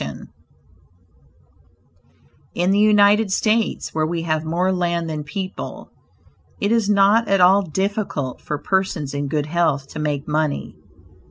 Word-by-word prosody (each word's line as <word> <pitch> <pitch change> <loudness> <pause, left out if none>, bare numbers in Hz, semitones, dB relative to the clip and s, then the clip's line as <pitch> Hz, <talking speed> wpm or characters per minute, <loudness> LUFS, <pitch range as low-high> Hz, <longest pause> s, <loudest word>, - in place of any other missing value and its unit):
Barnum 70 -2 -8 2.2
In 175 +2 +1
the 200 - +3
United 210 0 +4
States, 220 +3 0
where 155 0 0
we 165 0 -3
have 155 -1 -1
more 175 +4 0
land 170 -2 -1
than 155 -2 -4
people, 190 +5 -7 0.7
it 205 - 0
is 230 -3 +2
not 205 +3 +4
at 195 -1 +2
all 190 +3 +6
difficult 190 - -3
for 150 - -4
persons 180 -4 -1
in 145 0 -2
good 150 +1 -1
health 155 -4 0
to - - -7
make 150 -2 -2
money. 150 -1 -2
175 Hz, 140 wpm, -21 LUFS, 150-200 Hz, 2.2 s, all